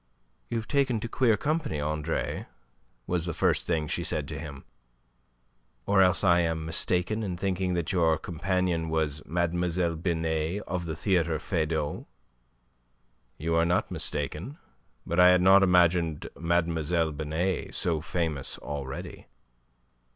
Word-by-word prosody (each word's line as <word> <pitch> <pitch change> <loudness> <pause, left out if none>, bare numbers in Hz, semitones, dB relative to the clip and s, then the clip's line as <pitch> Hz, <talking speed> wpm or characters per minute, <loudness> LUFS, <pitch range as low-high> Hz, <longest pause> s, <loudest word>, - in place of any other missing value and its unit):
"You 120 - -1
have 110 -1 -4
taken 135 -5 +1
to 115 - -3
queer 115 -2 +2
company, 150 - -1
Andre," 75 +2 -2 0.6
was 90 +2 -1
the 85 - -3
first - - +1
thing 80 -3 0
she - - -2
said 75 -2 -2
to - - -5
him. 70 -3 -8 1.2
"Or 100 -1 +4
else 90 +1 +4
I 90 -2 +5
am 80 -2 -1
mistaken 90 +6 0
in 95 -5 -3
thinking 95 -1 -1
that 85 0 -1
your 85 -4 +3
companion 90 -1 -1
was 75 -2 -1
Mlle. 85 +1 0
Binet 80 +2 -1
of 90 -1 -3
the 80 -2 -4
Theatre 85 -2 +1
Feydau." 80 -2 -2 1.3
"You 80 +2 -2
are 85 0 +4
not 85 +2 +1
mistaken. 75 - -3 0.5
But 85 +2 -1
I 90 - +8
had 90 0 +5
not 95 +1 +7
imagined 85 -4 +3
Mlle. 85 -1 0
Binet 80 +5 -2
so 80 -4 0
famous 80 -4 -2
already." 70 -2 -6
85 Hz, 135 wpm, -28 LUFS, 80-90 Hz, 1.3 s, I